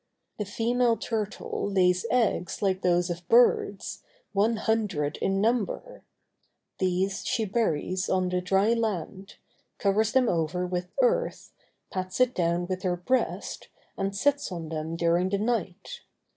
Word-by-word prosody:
The 210 - -1
female 235 +3 +1
turtle 210 -2 -3
lays 185 +1 +2
eggs 225 -6 0
like 190 -1 +1
those 175 -1 +2
of 170 0 -7
birds, 230 -4 +3 0.3
one 210 +3 +2
hundred 205 -10 -1
in 195 0 0
number; 235 - -1 0.8
these 190 +1 0
she 220 - 0
buries 185 -4 -1
on 185 -1 +1
the 180 0 0
dry 195 +5 +3
land, 200 -4 -3 0.4
covers 210 +2 +2
them 260 -2 +4
over 170 +1 0
with 180 0 -3
earth, - - 0 0.4
pats 185 +2 -4
it 255 0 +4
down 170 0 0
with 185 0 -3
her 180 -2 0
breast, 255 +9 -1 0.3
and 195 0 -2
sits 285 +3 +1
on 165 -3 -5
them 160 +1 -4
during 170 +2 +2
the 200 - +1
night. 215 - -3
195 Hz, 140 wpm, -27 LUFS, 180-225 Hz, 0.8 s, them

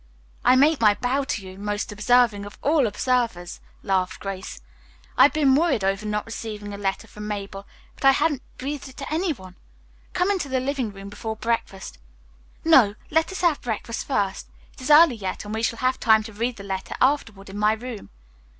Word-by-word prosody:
"I 255 - +6
make 285 +1 +4
my 210 -2 +5
bow 265 +4 -1
to 230 -8 -3
you, 185 +1 -10
most 205 +1 -3
observing 210 0 +3
of 205 0 -10
all 290 -4 +3
observers," 230 -7 -1 0.2
laughed 185 -1 0
Grace. 195 -2 -6 0.6
"I - - +3
have 285 - +3
been 290 -4 +3
worried 285 - +2
over 195 +2 0
not 210 0 -2
receiving 210 -2 -6
a - - -6
letter 195 +2 -2
from 210 0 -9
Mabel, 200 -1 -6 0.3
but - - -6
I 270 - +9
hadn't 290 -1 +1 0.2
breathed 280 +1 -5
it 260 - -16
to 280 +2 -5
any 340 +2 +1
one. 185 -9 -9 0.6
Come 365 +2 +2
into 365 -8 -2
the 260 0 +1
living 260 -4 -2
room 195 0 -10
before 220 +2 -5
breakfast. 220 -4 -3 0.7
No; 250 -11 +6 0.2
let 320 +3 +2
us 380 - -5
have 340 -5 +2
breakfast 230 0 -4
first. 200 -8 -1 0.2
It - - -15
is 255 - -5
early 300 -4 +7
yet 190 0 -5
and 210 - -6
we 220 - -2
shall 230 0 0
have 255 +1 0
time 220 -1 +4
to 220 0 -10
read 235 +4 -2
the 200 - -9
letter 190 -1 -4
afterward 225 -8 0
in 205 - -6
my 210 +1 +4
room. 225 - -7
225 Hz, 200 wpm, -24 LUFS, 205-270 Hz, 0.7 s, I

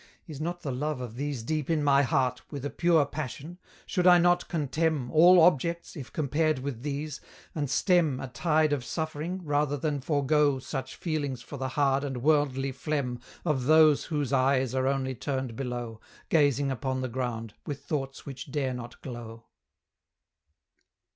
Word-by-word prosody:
Is 155 -3 -8
not 175 +2 -3
the 140 - -2
love 145 +2 -2
of 125 -3 -6
these 140 -2 -3
deep 155 +3 -2
in 160 -3 +1
my 140 -1 +5
heart 130 -1 +1
With 140 -2 -5
a 145 - -3
pure 165 -3 +3
passion? 155 +4 -6 0.3
should 180 0 +1
I 180 -1 +9
not 175 0 +3
contemn 155 -3 -1
All 175 +3 +7
objects, 170 +1 +2
if 135 -6 -8
compared 155 +1 +1
with 130 -3 -5
these? 145 +1 -4 0.3
and 145 -4 -2
stem 155 -1 +2
A 135 - -5
tide 155 +4 +1
of 140 -4 -1
suffering, 160 +5 -4
rather 145 -1 +1
than 145 0 -2
forego 145 0 +2
Such 130 0 -5
feelings 145 -7 -3
for 140 - -8
the 130 0 -2
hard 140 -1 +3
and 135 -4 -4
worldly 140 -3 +2
phlegm 130 -2 -2 0.3
Of 140 -6 0
those 155 0 +5
whose 145 -4 -2
eyes 130 -1 +2
are 130 0 +1
only 135 -1 0
turned 130 -2 -3
below, 120 -4 -5 0.3
Gazing 145 -3 +3
upon 130 +1 -2
the 130 - -2
ground, 115 -3 -4
with 140 -1 -5
thoughts 135 -2 -4
which 135 +1 -8
dare 135 -3 -1
not 120 -1 -8
glow? 115 -3 -8
140 Hz, 165 wpm, -28 LUFS, 130-155 Hz, 0.3 s, I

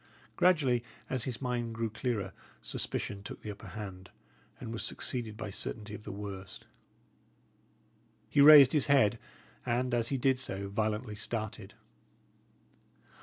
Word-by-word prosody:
Gradually, 140 -10 +3 0.3
as 130 -3 -1
his 130 0 -5
mind 120 -2 -2
grew 115 -1 -2
clearer, 115 -3 -2 0.3
suspicion 100 - -3
took 100 - -9
the 105 - -4
upper 105 +1 -11
hand, 95 -1 -8 0.5
and 115 - -6
was 115 - -3
succeeded 115 -4 -1
by 105 -2 -5
certainty 105 +2 -4
of 105 0 -9
the 105 - -5
worst. 100 -1 -7 1.6
He 145 - +3
raised 145 -3 +10
his 150 -4 +2
head, 120 -6 +4 0.4
and, 125 +1 0
as 115 -1 +2
he 135 - 0
did 130 0 +2
so, 100 -6 -4
violently 110 +2 -1
started. 110 0 -5
115 Hz, 135 wpm, -31 LUFS, 105-125 Hz, 1.6 s, raised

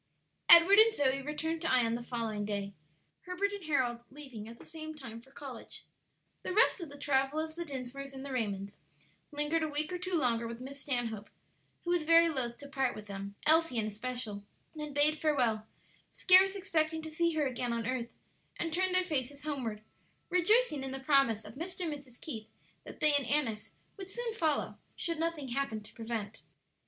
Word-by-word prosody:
Edward 345 +4 +9
and 450 +1 +8
Zoe 275 -4 +2
returned 320 +3 -3
to 335 - 0
Ion 235 -3 +3
the 235 - -2
following 230 -4 -3
day, 200 -1 -3 0.5
Herbert 375 +2 0
and 405 -2 -6
Harold 255 -6 +1
leaving 260 -6 -9
at 230 +1 -10
the - - -14
same 315 -1 -7
time 235 -6 -9
for 265 - -21
college. 270 -3 -9 0.6
The 370 - -4
rest 430 -3 +4
of 335 - -6
the 285 - -11
Travillas, 290 +3 0
the 340 +1 -5
Dinsmores, 275 -1 -6
and 270 0 -8
the 280 - -6
Raymonds 200 -5 -2 0.5
lingered 295 +2 0
a 315 - 0
week 300 +4 -2
or 360 - -3
two 365 0 -1
longer 235 -6 +1
with 230 0 -7
Miss 275 +2 -8
Stanhope, 230 -6 -2 0.5
who 345 - -1
was 350 -1 +3
very 330 +2 +6
loath 245 -6 -1
to 285 - -10
part 270 -2 0
with 210 - -8
them, 200 0 -7
Elsie 320 -4 +4
in 220 - +1
especial; 215 -1 -4 0.3
then 300 -1 -5
bade 295 +2 +3
farewell, 240 -8 +1 0.4
scarce 380 +1 +6
expecting 320 -5 0
to 315 - -5
see 335 +1 +1
her 305 -2 +2
again 250 -2 -2
on 230 -1 -2
earth, 240 -1 -2 0.5
and 330 -2 -2
turned 370 +1 +2
their 370 - +6
faces 285 -4 -2
homeward, 245 -8 -3 0.5
rejoicing 365 - +3
in 270 - -3
the 270 0 -5
promise 265 -6 +3
of 210 - -10
Mr. 350 +7 -6
and 330 -4 -1
Mrs. 270 -4 -11
Keith 220 -8 -6 0.4
that - - -11
they 305 -1 +5
and 285 -4 +2
Annis 255 -8 0 0.3
would 385 -1 -8
soon 475 +2 -3
follow, 315 -9 0 0.2
should 335 -2 -2
nothing 325 -5 -2
happen 250 -3 -1
to - - -11
prevent. 225 -2 -5
280 Hz, 190 wpm, -32 LUFS, 235-320 Hz, 0.6 s, Edward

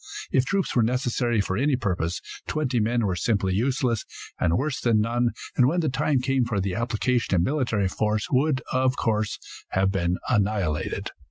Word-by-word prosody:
If 130 - +3
troops 195 +6 -1
were 120 - +5
necessary 120 -1 +1
for 95 -1 -2
any 135 +5 +2
purpose, 90 -7 -2 0.3
twenty 135 -6 0
men 115 +1 +1
were 95 -3 0
simply 100 -1 0
useless, 120 +1 0 0.4
and 80 - +2
worse 145 0 -2
than 115 -3 +3
none, 120 +2 +1 0.3
and 125 - +5
when 175 +6 +1
the 155 - 0
time 135 0 +1
came 135 0 +1
for 115 -4 -1
the 95 -1 -1
application 115 -1 0
of 85 - +3
military 120 -7 0
force 105 +2 -1
would, 135 +1 +2
of 130 0 +1
course, 110 -2 0 0.4
have 95 +1 +2
been 90 -2 0
annihilated. 100 -8 0
115 Hz, 175 wpm, -25 LUFS, 100-130 Hz, 0.4 s, were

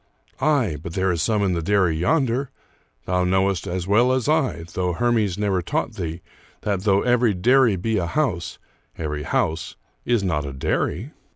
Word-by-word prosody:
" - - -35
Aye, 135 - +2
but 85 - -7
there 95 0 +1
is 85 -2 -1
some 105 -3 +1
in 95 -2 +1
the 85 - -1
dairy 95 -2 +2
yonder. 130 - +1 0.6
Thou 90 0 +1
knowest 95 +1 +1
as 90 -1 -3
well 115 +6 +3
as 130 -1 0
I, 150 - +1
though 90 -1 -1
Hermes 110 -2 +1
never 100 -3 0
taught 85 - -2
thee, 85 +2 -5 0.4
that, 100 -1 -2
though 100 -1 +3
every 120 -4 +3
dairy 120 +3 +4
be 110 +4 -1
a 85 - -2
house, 90 - -1 0.4
every 75 -2 -3
house 80 +1 -1 0.3
is 120 -4 +1
not 80 -6 0
a 70 -1 -6
dairy." 90 - -2
95 Hz, 180 wpm, -23 LUFS, 85-120 Hz, 0.6 s, dairy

